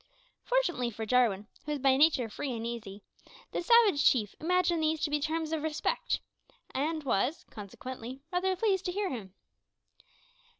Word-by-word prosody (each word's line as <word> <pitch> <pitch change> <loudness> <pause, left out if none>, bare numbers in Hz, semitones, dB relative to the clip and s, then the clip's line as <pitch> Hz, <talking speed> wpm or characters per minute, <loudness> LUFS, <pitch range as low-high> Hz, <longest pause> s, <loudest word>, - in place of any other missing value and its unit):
Fortunately 350 - +1
for 220 0 -5
Jarwin, 220 -4 +2 0.2
who 300 - -2
was 290 - -3
by 270 0 +4
nature 285 -4 +4
free 255 +4 -4
and 230 -1 -4
easy, 210 -4 -6 0.5
the - - -2
savage 410 -6 +5
chief 215 -6 +3
imagined 350 0 +2
these 315 0 +1
to 300 - 0
be 295 - +2
terms 320 +1 -2
of 320 -2 -1
respect, 315 0 -1 0.5
and 310 +3 -1
was, 260 +4 0
consequently, 250 +5 -8
rather 375 +1 +1
pleased 385 -1 +1
to 360 - 0
hear 400 +1 -1
them. 205 -7 -7
295 Hz, 160 wpm, -30 LUFS, 235-340 Hz, 0.5 s, savage